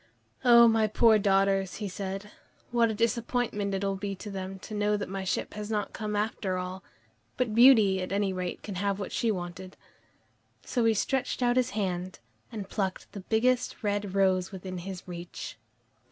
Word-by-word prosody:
"Oh, 235 -1 +8
my 225 -1 +3
poor 220 +1 +5
daughters," 195 -1 +2
he 210 - -4
said, 195 +2 -5 0.4
"what 235 -1 +3
a - - -1
disappointment 230 -3 0
it 195 - -2
will 195 0 0
be 200 0 -4
to 205 +2 -8
them 190 0 -5
to 205 - -10
know 210 0 +1
that 205 - -4
my 195 0 -4
ship 190 - -2
has 210 0 -6
not 210 -2 -2
come 210 -1 -4
home 205 - +3
after 195 -4 -3
all, 185 +1 -5 0.5
but 245 -4 0
Beauty 220 -6 +6
at 185 - -4
any 200 -1 0
rate 180 -1 -4
can 205 - -6
have 200 -1 0
what 200 - -5
she 230 - 0
wanted." 185 -1 -5 0.9
So 240 -3 0
he 225 -1 +4
stretched 260 +4 -1
out 245 0 +3
his 255 -2 +2
hand 185 -2 -2 0.3
and 210 -4 -6
plucked 190 -2 -3
the 200 - -7
biggest 245 +5 +1
red 205 -2 -1
rose 190 -1 +2
within 185 -1 -6
his 185 0 -7
reach. 175 -1 -7
200 Hz, 185 wpm, -28 LUFS, 190-220 Hz, 0.9 s, Oh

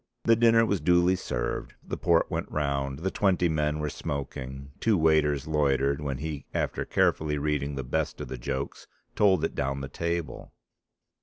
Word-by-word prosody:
The 115 - +5
dinner 115 0 +5
was 100 -3 0
duly 90 +1 +4
served, 60 -9 -3
the - - -4
port 85 -1 +2
went - - -2
round, 70 -2 -1
the 95 +5 -2
twenty 95 -3 +2
men 75 -1 0
were 75 -1 -2
smoking, 70 -1 -5
two 110 -3 +3
waiters 75 -3 +3
loitered, 70 -2 +1
when 70 -3 -2
he 75 -1 -5
after - - -1
carefully 75 -1 +1
reading 75 -1 -1
the 65 - -3
best - - -2
of - - -5
the 65 0 -6
jokes 65 +3 -4 0.3
told 95 -6 +4
it 80 - 0
down 70 +1 -2
the 70 - -4
table. 85 +3 -4
75 Hz, 170 wpm, -27 LUFS, 70-85 Hz, 0.3 s, The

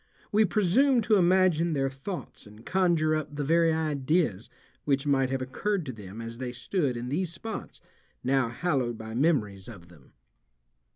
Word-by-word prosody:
We 215 +1 +4
presume 230 +7 +3
to 215 -1 +3
imagine 175 -2 +3
their 135 -2 +1
thoughts 135 - -7
and 105 +2 -15
conjure 170 -4 +2
up 150 -1 -4
the 145 - -2
very 165 +3 +3
ideas 150 - 0 0.3
which 140 0 0
might 135 -2 +2
have 135 0 -1
occurred 190 +7 -2
to 130 - -5
them 105 0 -9
as 115 +1 -7
they 125 -1 -4
stood 130 +1 -1
in 120 +1 -5
these 170 +5 -1
spots 220 +5 -7 0.4
now 130 -2 +2
hallowed 125 -3 -1
by 110 0 -8
memories 115 - 0
of 90 -8 -12
them. 80 -6 -19
145 Hz, 165 wpm, -28 LUFS, 120-175 Hz, 0.4 s, We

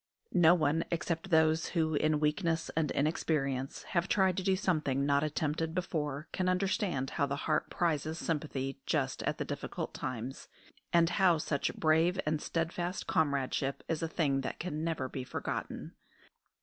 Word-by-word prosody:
No 175 0 +7
one 160 0 +2
except 170 +1 -2
those 160 -1 +4
who, 160 -1 +2
in 155 0 +2
weakness 165 +2 0
and 155 -2 +1
inexperience, 140 -3 -1
have 170 0 0
tried 190 -3 +3
to - - +1
do 190 0 +3
something 155 -8 +1
not 140 0 +3
attempted 155 +2 -1
before 150 -5 -2
can 185 -1 0
understand 185 - 0
how 140 - +1
the 140 - -1
heart 155 - +1
prizes 160 -2 0
sympathy 140 -5 -2
just - - 0
at - - -1
the - - -2
difficult - - -4
times, 125 +2 -5 0.4
and 170 -1 +5
how 180 -2 +4
such 150 -2 -1
brave 165 +4 +3
and 150 0 0
steadfast 175 +2 -2
comradeship 140 -2 0
is 165 -2 -1
a 165 - 0
thing 145 -5 +1
that - - -4
can 160 -2 -3
never 160 -5 -1
be 130 0 -5
forgotten. - - -4
160 Hz, 160 wpm, -32 LUFS, 145-170 Hz, 0.4 s, No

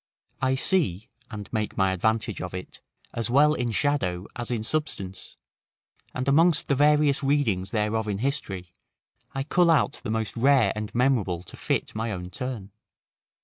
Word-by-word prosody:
I 130 0 +2
see, 130 - +1 0.2
and 105 -4 -7
make 110 -2 -2
my 95 -1 +3
advantage 110 +3 0
of 90 0 -5
it, 90 - -8 0.3
as 115 -1 -3
well 145 +4 +5
in 120 -5 -1
shadow 105 -9 0
as 120 -1 -4
in 115 -3 -2
substance; 105 -9 -4 0.8
and 130 +1 -3
amongst 160 +4 +4
the - - +2
various 150 0 +3
readings 130 -10 +1
thereof 110 +1 -1
in 100 -2 -1
history, 100 -9 -3 0.6
I 135 - -1
cull 170 +4 +3
out 150 -2 +2
the - - -4
most 110 -1 -2
rare 135 +1 +4
and 105 -1 -4
memorable 115 -9 +1
to - - -11
fit - - -2
my 110 +1 -2
own 90 -2 -6
turn. 120 -6 -5
115 Hz, 160 wpm, -26 LUFS, 100-140 Hz, 0.8 s, well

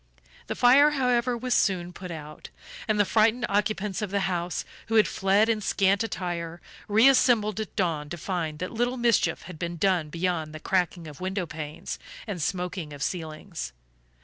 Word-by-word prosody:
The - - -3
fire, 270 +5 +6
however, 250 -1 +2
was 250 +1 -1
soon 180 -5 +1
put 180 +1 -8
out, 155 -2 -8 0.4
and 215 -1 +1
the 205 - +5
frightened 225 +4 +3
occupants 210 -1 0
of 210 - -2
the 200 +1 0
house, 175 -2 -2 0.2
who 225 - -1
had 215 - +6
fled 195 +3 +3
in 225 -2 +1
scant 195 0 +2
attire, 175 -4 -4 0.3
reassembled 220 -2 +4
at 215 - -5
dawn 160 -6 -1
to 175 - -5
find 165 -3 -3
that 185 +3 -4
little 245 +2 0
mischief 235 -2 +2
had 180 -4 -10
been 170 -1 -3
done 180 -4 +1
beyond 165 -2 -2
the - - -6
cracking 180 -1 0
of 150 0 -11
window 190 0 -2
panes 150 -1 -6 0.3
and 200 -6 -4
smoking 180 -2 -3
of 140 -1 -5
ceilings. 155 - -5
190 Hz, 175 wpm, -27 LUFS, 170-215 Hz, 0.4 s, fire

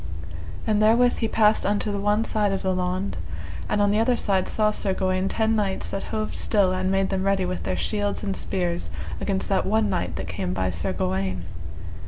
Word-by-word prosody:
And 215 -1 +2
therewith 235 +3 +4
he 225 - 0
passed 215 -1 +3
unto 205 +1 0
the 200 - -2
one 210 +2 +2
side 210 -3 +2
of 195 - -2
the 190 -1 +1
laund; 180 - -1 0.5
and 210 - +1
on 205 - +3
the 210 - +2
other 245 +2 +3
side 190 -3 +1
saw 215 -1 +2
Sir 195 -2 -1
Gawaine 185 0 0
ten 225 0 +1
knights 200 -3 -1
that 195 - -3
hoved 215 0 -3
still 200 -4 +3
and 185 0 0
made 195 0 +1
them 190 -1 0
ready 195 -1 +2
with 180 0 -3
their - - -1
shields 205 -1 -1
and 195 -2 -1
spears 175 -2 -1 0.3
against 195 -2 -1
that 195 -2 +2
one 215 0 +2
knight 90 - -1
that - - -4
came 90 0 -3
by 95 -1 0
Sir 85 +1 -1
Gawaine. 95 0 -1
195 Hz, 210 wpm, -25 LUFS, 185-210 Hz, 0.5 s, therewith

